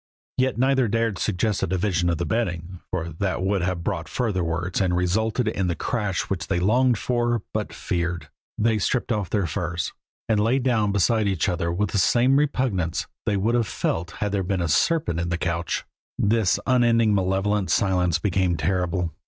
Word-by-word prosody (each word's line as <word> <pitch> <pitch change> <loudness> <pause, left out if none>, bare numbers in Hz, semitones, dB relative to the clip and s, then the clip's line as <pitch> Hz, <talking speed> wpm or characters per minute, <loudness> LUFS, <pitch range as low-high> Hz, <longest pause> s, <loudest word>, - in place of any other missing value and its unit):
Yet 130 -1 +1
neither 130 0 +3
dared 115 -2 0
suggest 105 +1 0
a - - 0
division 90 -1 0
of 85 - 0
the 85 - -2
bedding, 90 -4 -2
for 85 -2 -3
that 95 -2 -1
would 95 0 +1
have 90 -1 -2
brought 80 -2 -3
further 100 -1 -1
words 90 +3 -1
and 90 -2 +1
resulted 110 +6 0
in 100 -4 0
the 85 - -1
crash 105 +1 -1
which 90 -5 -4
they 95 -2 0
longed 120 +6 +3
for, 120 -1 0
but - - -2
feared. 85 0 -3 0.3
They 110 0 +2
stripped 120 +5 0
off 105 -5 -1
their 100 -4 +1
furs, 85 0 -3 0.3
and 110 -2 +2
lay 115 +5 +2
down 120 -6 +1
beside 105 +2 +2
each 95 -5 0
other 85 -1 -1
with 100 +5 -1
the 100 - +1
same 125 +7 +4
repugnance 125 - 0 0.2
they 100 - +2
would 110 +5 +1
have 120 -3 +2
felt 85 -1 -2
had 105 -1 -2
there 100 -1 0
been 95 0 -1
a 85 - 0
serpent 85 - +1
in 85 +1 -2
the 85 - -1
couch. 85 0 -2 0.3
This 110 -1 +2
unending 115 -4 +3
malevolent 95 +1 +1
silence 90 -4 +2
became 95 -3 0
terrible. 90 +1 -1
95 Hz, 185 wpm, -24 LUFS, 90-115 Hz, 0.3 s, same